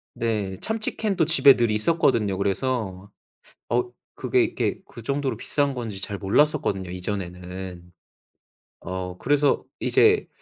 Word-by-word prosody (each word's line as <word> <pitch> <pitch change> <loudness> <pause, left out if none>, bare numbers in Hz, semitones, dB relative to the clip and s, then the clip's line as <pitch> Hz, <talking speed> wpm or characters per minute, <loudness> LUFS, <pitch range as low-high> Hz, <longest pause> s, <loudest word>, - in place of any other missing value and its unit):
네 105 -5 -2
참치 220 0 -1
캔도 195 -7 +1
집에 150 -4 +7
늘 120 -2 +1
있었거든요. 110 - +2
그래서 100 -1 -2 0.6
어 120 +1 +1 0.3
그게 - - +2
이렇게 - - -1
그 - - -12
정도로 135 -1 -2
비싼 140 +4 0
건지 110 -6 -5
잘 100 0 -3
몰랐었거든요 100 -3 +1
이전에는. 90 -1 -6 0.9
어 90 -1 -5
그래서 145 +1 +2 0.2
이제 435 -1 +3
110 Hz, 270 characters per minute, -24 LUFS, 95-140 Hz, 0.9 s, 집에